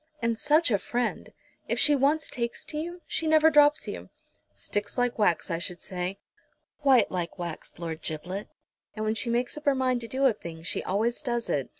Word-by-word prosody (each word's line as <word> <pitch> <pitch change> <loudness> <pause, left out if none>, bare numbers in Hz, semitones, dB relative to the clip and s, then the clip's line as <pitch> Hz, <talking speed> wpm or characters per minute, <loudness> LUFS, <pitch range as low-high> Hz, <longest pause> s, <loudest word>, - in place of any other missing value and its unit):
"And 230 -1 0
such 300 +4 +3
a 205 - +3
friend! 240 +3 -2 0.4
If - - 0
she 295 - +6
once 285 +3 +2
takes 235 -1 -4
to 300 - -5
you 345 +2 -6
she 325 - -2
never 315 0 +6
drops 295 0 +5
you." - - -6 0.4
"Sticks 205 +2 -4
like 245 -1 0
wax, 175 -6 +2
I 165 - -1
should 175 0 -3
say." 185 +1 -4 0.6
"Quite 265 -6 +5
like 175 -1 -3
wax, 170 -3 -6
Lord 165 -1 -5
Giblet. 180 +6 -4 0.5
And 215 0 -3
when 215 - +1
she 230 +2 -1
makes 240 +4 0
up 300 - -25
her 280 -1 +4
mind 255 -2 +1
to 230 - -6
do 265 +3 0
a 260 - +5
thing 165 -5 -9
she 170 - -1
always 225 +7 0
does 240 -5 -2
it. 140 -3 -1
235 Hz, 205 wpm, -27 LUFS, 185-280 Hz, 0.6 s, she